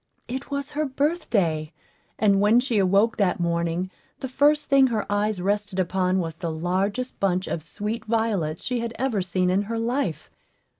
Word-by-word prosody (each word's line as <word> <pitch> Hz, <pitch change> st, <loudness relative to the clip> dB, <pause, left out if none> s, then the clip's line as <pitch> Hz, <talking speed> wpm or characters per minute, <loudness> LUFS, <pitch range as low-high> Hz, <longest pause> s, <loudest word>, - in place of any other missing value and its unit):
It 260 Hz, +3 st, -5 dB
was 280 Hz, 0 st, -3 dB
her 300 Hz, +1 st, -1 dB
birthday; 235 Hz, -, 0 dB, 0.5 s
and 200 Hz, -2 st, +3 dB
when 215 Hz, +4 st, +5 dB
she 245 Hz, -4 st, +1 dB
awoke 200 Hz, +4 st, +3 dB
that 195 Hz, -4 st, +1 dB
morning, 170 Hz, +1 st, -1 dB, 0.3 s
the 265 Hz, -, -4 dB
first 290 Hz, +3 st, +3 dB
thing 275 Hz, -1 st, +5 dB
her 225 Hz, -4 st, -1 dB
eyes 205 Hz, -1 st, 0 dB
rested 205 Hz, +1 st, -1 dB
upon 185 Hz, 0 st, +1 dB
was 165 Hz, -3 st, -3 dB
the 170 Hz, -1 st, -3 dB
largest 190 Hz, +9 st, -2 dB
bunch 185 Hz, -1 st, +1 dB
of 165 Hz, -, -3 dB
sweet 210 Hz, +9 st, -4 dB
violets 215 Hz, -8 st, -1 dB
she 250 Hz, -1 st, 0 dB
had 230 Hz, 0 st, -4 dB
ever 250 Hz, -7 st, 0 dB
seen 180 Hz, 0 st, 0 dB
in 190 Hz, +2 st, +2 dB
her 230 Hz, -, -1 dB
life. 230 Hz, -, -1 dB
205 Hz, 170 wpm, -24 LUFS, 180-245 Hz, 0.5 s, when